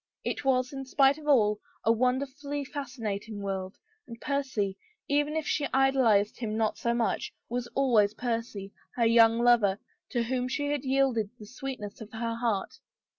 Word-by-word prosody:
It - - -3
was, 255 -1 +1
in 270 0 -5
spite 275 +2 +3
of 300 - -11
all, 210 -7 +4 0.3
a 225 - +5
wonder 250 +4 +2
fully 285 +1 -5
fascinating 225 -7 -5
world, 190 -1 -4 0.3
and 230 -1 -9
Percy 260 -9 -1 0.2
— 430 - -46
even 290 +1 +1
if 315 -1 -1
she 290 -2 0
ideal 270 -2 +4
ized 205 -1 +3
him 220 -3 -2
not 220 -1 0
so 235 0 0
much 235 -1 -1
— - - -52
was 245 0 -2
always 225 -6 +3
Percy, 225 -5 -3 0.2
her 235 - +2
young 230 0 +6
lover, 235 -5 +4 0.3
to 240 -2 0
whom 250 +1 -1
she 285 +3 -1
had 290 -2 -1
yielded 260 -5 +2
the 215 - -11
sweetness 250 -3 -7
of 220 - -9
her 230 +1 -2
heart. 230 -4 -2
240 Hz, 180 wpm, -29 LUFS, 215-270 Hz, 0.3 s, young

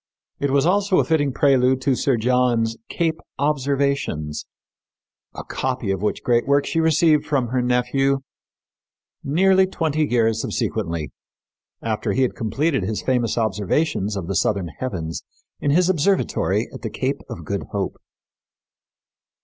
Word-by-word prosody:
It 140 - 0
was 140 +1 +2
also 195 +1 +2
a - - +4
fitting 145 -4 +1
prelude 130 -1 +3
to 135 0 +2
Sir 130 0 +1
John's 120 -1 +1
Cape 165 -2 -1 0.2
Observations, 140 - -1 0.9
a - - -6
copy 130 -6 -2
of 95 -1 -2
which 105 - -1
great 120 0 +2
work 140 0 +3
she 165 - -1
received 160 -1 +4
from 140 -5 0
her 130 +1 0
nephew 135 +3 +1 1.0
nearly 190 +6 +4
twenty 155 -4 0
years 115 -4 +1
subsequently, 85 -11 -2 0.7
after 110 -1 -1
he 130 - +2
had 125 - 0
completed 135 +5 0
his 105 +3 -3
famous 125 -3 0
observations 105 - 0
of 95 - -4
the 95 - -3
southern 95 -2 0
heavens 85 -10 -4 0.4
in 145 - -1
his 175 +5 +4
observatory 185 +2 +1
at - - -9
the - - -3
Cape - - -2
of - - -7
Good - - -3
Hope. - - -3
130 Hz, 140 wpm, -22 LUFS, 110-150 Hz, 1.0 s, a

